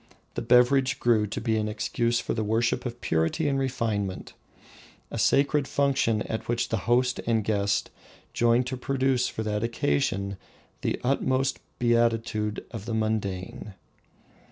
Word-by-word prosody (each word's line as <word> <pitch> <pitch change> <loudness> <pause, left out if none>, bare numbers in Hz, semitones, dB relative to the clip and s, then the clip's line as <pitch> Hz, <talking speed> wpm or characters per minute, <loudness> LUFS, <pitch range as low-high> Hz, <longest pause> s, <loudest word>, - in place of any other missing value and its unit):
The - - -3
beverage 125 +2 +4
grew 110 -3 +3
to 100 - -4
be 110 -2 0
an 105 0 0
excuse 115 +2 0
for - - -2
the 110 - -1
worship 115 +4 0
of 120 0 -8
purity 80 - 0
and 135 -1 +1
refinement, 115 -8 -2 0.8
a - - -4
sacred 140 0 +3
function 135 -6 +1
at 110 - -5
which 120 0 0
the 115 - 0
host 125 +1 +3
and 115 -2 +2
guest 100 -1 0 0.4
joined 120 +1 +3
to 130 +1 -4
produce 130 -1 +1
for 110 - -4
that 105 0 -1
occasion 100 -1 0 0.4
the - - -1
utmost 130 0 +1 0.2
beatitude 115 -3 +1
of 110 -4 -7
the 115 - -1
mundane. 110 0 -3
115 Hz, 145 wpm, -27 LUFS, 105-125 Hz, 0.8 s, beverage